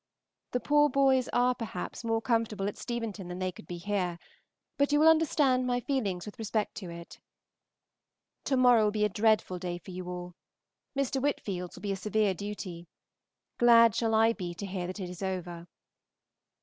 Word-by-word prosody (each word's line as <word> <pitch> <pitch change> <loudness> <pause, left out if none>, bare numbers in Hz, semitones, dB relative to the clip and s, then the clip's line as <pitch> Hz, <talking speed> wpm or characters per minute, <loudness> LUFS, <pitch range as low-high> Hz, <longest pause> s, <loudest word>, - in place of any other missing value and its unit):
The 250 - -1
poor 295 +2 +3
boys 265 -2 +3
are, 245 +1 +3
perhaps, 225 -3 -6
more 225 0 0
comfortable 225 -4 0
at 205 - -3
Steventon 225 -6 -5
than 180 0 -6
they 185 0 -2
could 170 - -14
be 175 - -5
here, 180 -2 -2 0.6
but 280 +1 +1
you 295 - +4
will 310 - +6
understand 290 -5 +3
my 245 0 +1
feelings 215 -9 -2
with 210 +3 -10
respect 215 -1 -1
to 185 -4 -6
it. 170 0 -10 1.3
To 265 - +1
morrow 245 -3 +6
will 210 - +2
be 210 0 +1
a - - +1
dreadful 210 -2 +1
day 175 -1 -4
for 185 - -11
you 180 0 -6
all. 180 0 -6 0.6
Mr. 270 -1 0
Whitfield's 195 -10 -2
will - - -13
be 200 - -1
a - - 0
severe 210 +1 +1
duty. 185 -3 -7 0.7
Glad 230 -2 +7
shall 225 -2 +1
I 225 +1 +4
be 175 -5 -6
to 200 - -6
hear 185 -2 -4
that 185 +3 -6
it 185 - -4
is 180 0 -9
over. 175 -3 -4
210 Hz, 185 wpm, -29 LUFS, 180-245 Hz, 1.3 s, Glad